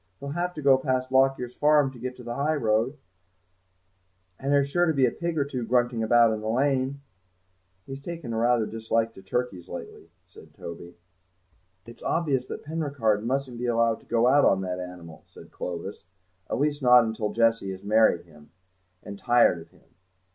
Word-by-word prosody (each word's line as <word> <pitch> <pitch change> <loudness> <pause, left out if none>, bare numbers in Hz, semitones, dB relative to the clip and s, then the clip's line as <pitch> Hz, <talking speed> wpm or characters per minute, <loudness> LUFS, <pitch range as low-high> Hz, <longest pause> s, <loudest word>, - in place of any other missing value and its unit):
He'll 140 - -6
have 175 +4 -3
to 150 - -6
go 135 -1 +5
past 130 -1 -1
Lockyer's 130 -2 +2
farm 150 -1 +3
to 125 - -13
get 125 +1 -5
to 125 - -11
the 120 0 -5
high 145 +5 0
road, 115 +2 0 1.4
and 135 +1 -2
there's 140 -1 +3
sure 175 +5 +1
to 160 - +1
be 135 -2 +4
a 120 - +1
pig 170 +3 -4
or 140 - +1
two 130 -4 -4
grunting 120 0 +1
about 115 0 +4
in 110 - -4
the 110 - -3
lane." 135 +2 0 0.8
"He's 135 +1 -8
taken 165 -6 -6
rather 120 +1 +2
a - - -4
dislike 115 0 -1
to 95 - -13
turkeys 95 -3 -3
lately," 85 -1 -9 0.2
said 90 - -17
Toby. 85 +1 -9 0.9
"It's 115 +1 -14
obvious 140 -7 0
that - - -7
Penricarde 140 -9 -1
mustn't 130 0 -2
be 125 - -2
allowed 115 -1 +2
to - - -24
go 115 0 +2
out 140 +3 +5
on 95 - +3
that 90 -1 -4
animal," 90 -3 -9
said - - -15
Clovis, 90 +3 -6 0.5
"at - - -1
least 145 +2 0
not 125 -3 +5
till 105 -1 -2
Jessie 115 -3 +1
has 95 0 -7
married 105 -4 +3
him, 75 -3 -18 0.5
and 100 0 -9
tired 120 -8 +3
of - - -15
him. - - -25
120 Hz, 190 wpm, -26 LUFS, 110-140 Hz, 1.4 s, go